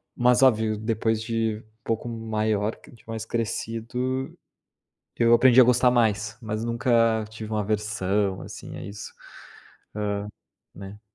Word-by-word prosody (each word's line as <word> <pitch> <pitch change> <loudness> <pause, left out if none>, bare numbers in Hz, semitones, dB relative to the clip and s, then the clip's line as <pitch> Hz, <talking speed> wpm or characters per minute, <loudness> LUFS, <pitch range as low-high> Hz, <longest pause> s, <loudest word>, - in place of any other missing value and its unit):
Mas 125 +1 +4
óbvio, 110 -4 +3
depois 110 0 0
de 115 -1 -1
um 110 - -14 0.2
pouco 115 +1 -2
maior, 110 -2 -1
de 115 - -19
mais 110 -1 -5
crescido, 120 +3 -3 0.8
eu 115 -1 +4
aprendi 125 +1 +6
a 130 - +10
gostar 125 +1 +4
mais, 110 -3 +1
mas 110 0 -3
nunca 115 -1 +2
tive 110 0 -8
uma 110 -1 0
aversão 105 -2 -1
assim - - -9
a - - -7
isso, 100 0 -8 1.7
hã - - -11
né. 100 +2 -9
110 Hz, 135 wpm, -25 LUFS, 105-115 Hz, 1.7 s, a